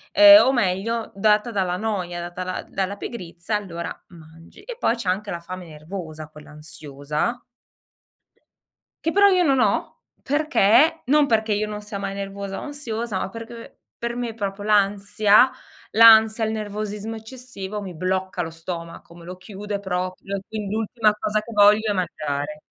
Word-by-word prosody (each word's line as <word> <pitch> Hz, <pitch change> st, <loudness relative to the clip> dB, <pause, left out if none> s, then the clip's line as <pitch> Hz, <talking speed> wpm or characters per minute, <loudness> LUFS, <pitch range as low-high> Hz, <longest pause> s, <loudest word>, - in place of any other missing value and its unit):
uhm, 305 Hz, 0 st, +10 dB
o 265 Hz, -, +4 dB
meglio 225 Hz, 0 st, -1 dB
data 210 Hz, +3 st, +2 dB
dalla 185 Hz, -3 st, -1 dB
noia, 185 Hz, -5 st, -3 dB
data 175 Hz, +1 st, -6 dB
la 185 Hz, 0 st, -4 dB
dalla 195 Hz, +1 st, -3 dB
pigrizia, 180 Hz, -1 st, -5 dB
allora 170 Hz, -4 st, -6 dB
mangi, 165 Hz, -1 st, -16 dB
e -, -, -8 dB
poi 235 Hz, -, +2 dB
c'è 205 Hz, -6 st, -3 dB
anche 200 Hz, +3 st, -2 dB
la 170 Hz, -, -4 dB
fame 180 Hz, 0 st, -8 dB
nervosa, 155 Hz, 0 st, -8 dB
quella 150 Hz, -1 st, -14 dB
ansiosa 150 Hz, -, -4 dB, 1.7 s
che 325 Hz, -, +1 dB
però 405 Hz, +1 st, +6 dB
io 365 Hz, -2 st, +3 dB
non 275 Hz, -5 st, +3 dB
ho, 210 Hz, -3 st, 0 dB, 0.2 s
perché 295 Hz, 0 st, +3 dB
non 290 Hz, +3 st, +4 dB
perché 220 Hz, -3 st, +1 dB
io 210 Hz, +1 st, -1 dB
non 210 Hz, 0 st, -6 dB
sia 210 Hz, -1 st, -7 dB
mai 195 Hz, 0 st, -4 dB
nervosa 195 Hz, 0 st, -5 dB
o -, -, -7 dB
ansiosa, 235 Hz, -8 st, -4 dB
ma -, -, -3 dB
perché 230 Hz, +1 st, -10 dB, 0.2 s
per 235 Hz, 0 st, -4 dB
me 240 Hz, -2 st, -3 dB
proprio 205 Hz, -2 st, -5 dB
l'ansia 205 Hz, +2 st, +4 dB, 0.4 s
l'ansia, 220 Hz, 0 st, +7 dB
il 220 Hz, -, -1 dB
nervosismo 210 Hz, 0 st, -4 dB
eccessivo 220 Hz, -3 st, -8 dB
mi 185 Hz, -4 st, -8 dB
blocca 185 Hz, +1 st, -2 dB
lo 165 Hz, -, -3 dB
stomaco, 170 Hz, 0 st, -8 dB
me 170 Hz, -, -13 dB
lo 180 Hz, +1 st, -8 dB
chiude 205 Hz, +1 st, -6 dB
proprio, 185 Hz, +1 st, -4 dB
quindi 210 Hz, -1 st, -4 dB
l'ultima 220 Hz, -1 st, +1 dB
cosa 210 Hz, 0 st, 0 dB
che 230 Hz, -, -11 dB
voglio 210 Hz, +1 st, +5 dB
è -, -, +1 dB
mangiare. 150 Hz, -4 st, -3 dB
205 Hz, 160 wpm, -23 LUFS, 180-225 Hz, 1.7 s, uhm